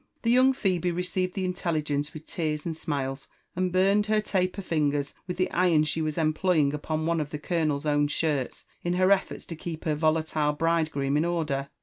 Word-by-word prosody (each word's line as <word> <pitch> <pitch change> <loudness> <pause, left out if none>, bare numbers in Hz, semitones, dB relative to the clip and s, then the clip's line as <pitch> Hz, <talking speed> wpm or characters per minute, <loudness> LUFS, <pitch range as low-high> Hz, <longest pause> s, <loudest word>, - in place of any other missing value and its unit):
The 230 - +3
young 255 +2 +6
Phebe 185 -7 0
received 180 +1 -2
the 190 -2 -1
intelligence 155 -5 -1
with 155 0 -10
tears 155 -3 -3
and 165 -2 -2
smiles, 135 -3 -3 0.3
and 185 0 0
burned 195 +3 +3
her 215 0 +3
taper 190 -2 -1
fingers 145 -4 0
with 180 - -4
the 185 - 0
iron 175 -4 +3
she 155 +1 -1
was 155 -1 -2
employing 155 -2 +2
upon 155 +1 -2
one 165 -1 +1
of 145 - -4
the 150 - -4
colonel's 155 -2 -1
own 145 -1 +2
shirts, 145 -3 -2 0.2
in 175 - 0
her 185 +2 +3
efforts 195 -1 +1
to 165 - -7
keep 160 0 -6
her 155 - +1
volatile 155 -1 +1
bride 165 +1 +1
groom 140 -1 0
in 155 - +2
order. 150 -5 -1
160 Hz, 200 wpm, -27 LUFS, 150-180 Hz, 0.3 s, young